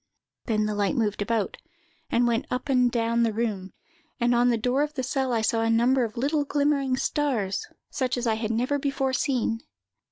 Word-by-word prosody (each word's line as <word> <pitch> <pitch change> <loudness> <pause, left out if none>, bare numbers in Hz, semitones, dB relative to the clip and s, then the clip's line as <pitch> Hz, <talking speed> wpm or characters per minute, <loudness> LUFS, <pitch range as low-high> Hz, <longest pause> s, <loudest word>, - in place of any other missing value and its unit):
Then 215 -3 +1
the 210 - -1
light 205 +4 0
moved 210 -5 0
about, 215 -1 -1 0.5
and 240 +1 +2
went 235 -1 0
up 250 +3 -3
and 250 -2 +3
down 235 0 +1
the 230 -1 +2
room; 210 -4 -2 0.5
and 240 0 +2
on 240 +1 +4
the 235 - +2
door 250 +5 +1
of 300 0 -2
the 260 - -2
cell 265 0 -1
I 230 -2 +1
saw 225 +1 +1
a 225 - +1
number 245 +3 +3
of 225 -1 -4
little 290 +4 +1
glimmering 280 -2 +1
stars, 265 - -1 0.2
such 255 -2 -1
as 245 - -2
I 225 - +2
had 220 0 -2
never 250 +6 0
before 270 -1 -1
seen. 245 -4 0
240 Hz, 200 wpm, -26 LUFS, 225-265 Hz, 0.5 s, on